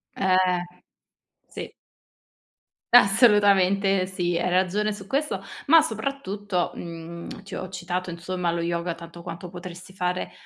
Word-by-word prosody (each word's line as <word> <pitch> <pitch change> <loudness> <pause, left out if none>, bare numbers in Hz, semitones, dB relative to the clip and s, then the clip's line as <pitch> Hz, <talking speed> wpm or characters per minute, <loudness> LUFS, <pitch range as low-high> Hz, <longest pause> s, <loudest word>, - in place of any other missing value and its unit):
Eh, 190 -1 +3 1.1
sì. - - -8 1.2
Assolutamente 200 -4 +5
sì, 175 -2 -1
hai 180 +1 0
ragione 190 +4 +1
su 195 -2 -10
questo, 270 -7 -1 0.2
ma 325 +2 +7
soprattutto, 210 - -2
mhmm, 170 +2 -8
ti 200 - -9
ho 185 - -4
citato, 180 0 -4
insomma, 175 0 -2
lo 170 0 -2
yoga 170 0 -1
tanto 170 0 -11
quanto 170 +1 -7
potresti 180 +1 -10
fare 180 0 -2
185 Hz, 120 wpm, -25 LUFS, 175-200 Hz, 1.2 s, ma